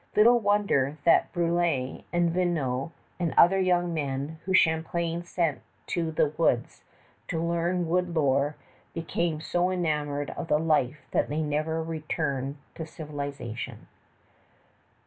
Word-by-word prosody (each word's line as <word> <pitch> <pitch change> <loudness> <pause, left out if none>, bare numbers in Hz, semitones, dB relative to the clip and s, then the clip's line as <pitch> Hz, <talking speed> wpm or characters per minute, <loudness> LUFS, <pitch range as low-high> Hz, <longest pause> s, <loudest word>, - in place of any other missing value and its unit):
Little 235 +3 +6
wonder 200 - +2
that 170 - +4
Brulé, 170 -6 0
and 175 -1 +2
Vignau, 165 -6 0 0.3
and 170 -3 -1
other 190 +3 +7
young 175 -2 +2
men 145 +1 -3
whom 190 0 +2
Champlain 170 0 +1
sent 170 -4 -1 0.2
to 170 -2 -1
the 155 -1 +2
woods 120 -7 +1 0.4
to 165 - -2
learn 170 +1 0
wood 175 +1 0
lore, 140 -1 +2 0.4
became 165 0 -1
so 175 +2 +1
enamored 150 -5 -1
of - - -5
the 150 - +3
life 155 -3 +1
that - - +1
they 155 +2 -1
never 155 +2 -1
returned 150 -4 -3 0.2
to 160 - -6
civilization. 140 -7 -6
160 Hz, 125 wpm, -27 LUFS, 145-175 Hz, 0.4 s, other